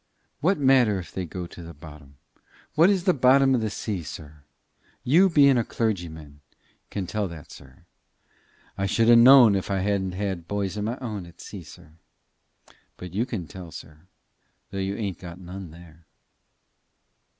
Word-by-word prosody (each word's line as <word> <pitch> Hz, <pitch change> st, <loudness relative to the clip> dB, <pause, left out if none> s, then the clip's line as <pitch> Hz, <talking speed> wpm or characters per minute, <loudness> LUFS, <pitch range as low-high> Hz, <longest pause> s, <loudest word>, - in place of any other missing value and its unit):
What 185 Hz, +5 st, +2 dB
matter 130 Hz, -7 st, +4 dB
if 90 Hz, -, -8 dB
they 95 Hz, -, -4 dB
go 90 Hz, +2 st, -6 dB
to 85 Hz, -, -12 dB
the 85 Hz, -1 st, -10 dB
bottom? 75 Hz, -2 st, -14 dB, 0.6 s
What 165 Hz, +5 st, +5 dB
is 190 Hz, -3 st, +1 dB
the 185 Hz, -, +3 dB
bottom 135 Hz, 0 st, +4 dB
of 125 Hz, -, +1 dB
the 110 Hz, -, -1 dB
sea, 100 Hz, -2 st, -4 dB
sir? 75 Hz, -2 st, -10 dB, 0.6 s
You 175 Hz, +9 st, +4 dB
bein' 140 Hz, -6 st, +5 dB
a -, -, +1 dB
clergyman 80 Hz, -11 st, -4 dB, 0.5 s
can 100 Hz, -2 st, -4 dB
tell 105 Hz, +2 st, -2 dB
that, 80 Hz, -4 st, -11 dB
sir. 65 Hz, -1 st, -15 dB, 0.9 s
I 100 Hz, -, 0 dB
shouldn't 115 Hz, +3 st, +5 dB
ha' -, -, +7 dB
known 125 Hz, -4 st, +8 dB
it 100 Hz, -, +2 dB
if 95 Hz, -, -9 dB
I 95 Hz, -1 st, 0 dB
hadn't 95 Hz, -2 st, -1 dB
had 95 Hz, -3 st, -4 dB
bys 100 Hz, -1 st, -2 dB
o' 105 Hz, -, -4 dB
my 115 Hz, +4 st, -3 dB
own 105 Hz, -9 st, -6 dB
at 85 Hz, -, -18 dB
sea, 100 Hz, -, -9 dB
sir. 85 Hz, 0 st, -15 dB, 1.1 s
But 90 Hz, -1 st, -9 dB
you 115 Hz, +6 st, -1 dB
can 100 Hz, -9 st, -4 dB
tell, 90 Hz, +2 st, -10 dB
sir, 80 Hz, +2 st, -13 dB, 0.6 s
though 95 Hz, -, -4 dB
you 95 Hz, +1 st, -2 dB
ain't 100 Hz, -6 st, -4 dB
got 85 Hz, -1 st, -10 dB
none 90 Hz, 0 st, -9 dB
there." 80 Hz, 0 st, -16 dB
95 Hz, 175 wpm, -25 LUFS, 85-115 Hz, 1.1 s, known